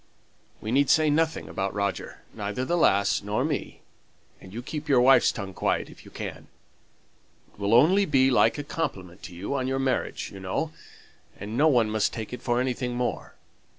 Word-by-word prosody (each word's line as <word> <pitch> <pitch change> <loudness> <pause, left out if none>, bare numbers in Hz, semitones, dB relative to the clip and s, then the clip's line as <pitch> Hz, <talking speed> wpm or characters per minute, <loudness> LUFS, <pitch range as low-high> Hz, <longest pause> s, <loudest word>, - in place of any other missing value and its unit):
We 110 - -4
need 140 +2 +3
say 155 -1 +4
nothing 160 +1 0
about 95 +1 -3
Roger, 100 -1 -3
neither 105 +4 -3
the 175 - 0
lass 100 - +3
nor 105 +6 -1
me, 150 -3 -4 0.6
and 95 - -13
you 120 +4 -6
keep 150 +3 -6
your 135 -3 +5
wife's 135 +2 +6
tongue 100 -4 -6
quiet, - - -1
if - - -16
you - - -12
can. - - -7 1.1
It - - -23
will 100 +2 +2
only 180 +11 +5
be 135 -4 +3
like 125 - +3
a 145 - -4
compliment 95 - -5
to 90 - -10
you 95 +10 -4
on 130 -2 -1
your 135 0 -1
marriage, 135 -2 -2
you 95 - -9
know 95 +12 -2 0.7
and 105 +3 -6
no 150 +5 +4
one 120 -7 +3
must 110 -1 0
take 110 +1 -6
it 125 - -6
for 120 -1 0
anything 125 -1 -2
more. 125 0 -3
125 Hz, 190 wpm, -26 LUFS, 100-140 Hz, 1.1 s, wife's